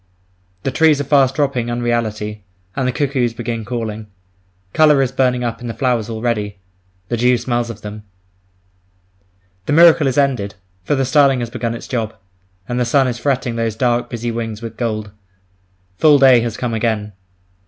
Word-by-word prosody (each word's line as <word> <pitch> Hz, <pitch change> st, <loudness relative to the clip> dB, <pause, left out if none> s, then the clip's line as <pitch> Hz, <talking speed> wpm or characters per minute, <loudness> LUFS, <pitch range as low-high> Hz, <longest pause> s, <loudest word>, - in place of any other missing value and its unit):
The 135 Hz, -, -1 dB
trees 155 Hz, 0 st, +3 dB
are -, -, 0 dB
fast 135 Hz, -2 st, +3 dB
dropping 135 Hz, -5 st, 0 dB
unreality, 110 Hz, -3 st, -2 dB, 0.3 s
and 130 Hz, -, -1 dB
the -, -, +1 dB
cuckoos 130 Hz, -4 st, -1 dB
begin 115 Hz, -1 st, -4 dB
calling. 110 Hz, -2 st, -5 dB, 0.7 s
Colour 150 Hz, -2 st, +5 dB
is 130 Hz, -, -2 dB
burning 125 Hz, -2 st, +1 dB
up 120 Hz, 0 st, -3 dB
in 120 Hz, -, -6 dB
the 115 Hz, -, -5 dB
flowers 120 Hz, -3 st, 0 dB
already; 110 Hz, -3 st, -2 dB, 0.5 s
the 120 Hz, -, -1 dB
dew 125 Hz, +1 st, +3 dB
smells 120 Hz, 0 st, -2 dB
of 110 Hz, -2 st, -8 dB
them. 105 Hz, +1 st, -7 dB, 1.7 s
The 145 Hz, -, +1 dB
miracle 165 Hz, -2 st, +6 dB
is 130 Hz, -, -1 dB
ended, 125 Hz, -9 st, 0 dB, 0.3 s
for 145 Hz, -, 0 dB
the 135 Hz, -1 st, 0 dB
starling 135 Hz, -1 st, +3 dB
has 120 Hz, -1 st, -4 dB
begun 115 Hz, -1 st, -3 dB
its -, -, -9 dB
job; 115 Hz, -4 st, -3 dB, 0.5 s
and 120 Hz, 0 st, -2 dB
the -, -, +2 dB
sun 130 Hz, +3 st, +2 dB
is 120 Hz, -1 st, -3 dB
fretting 125 Hz, -3 st, -1 dB
those 115 Hz, -2 st, -1 dB
dark, 120 Hz, +1 st, 0 dB
busy 120 Hz, 0 st, -3 dB
wings 115 Hz, -2 st, -4 dB
with 115 Hz, -1 st, -8 dB
gold. 110 Hz, -3 st, -3 dB, 0.9 s
Full 150 Hz, -2 st, +6 dB
day 135 Hz, -3 st, +6 dB
has 115 Hz, -2 st, -3 dB
come 120 Hz, -2 st, -3 dB
again. 110 Hz, -2 st, -1 dB
120 Hz, 175 wpm, -18 LUFS, 115-130 Hz, 1.7 s, miracle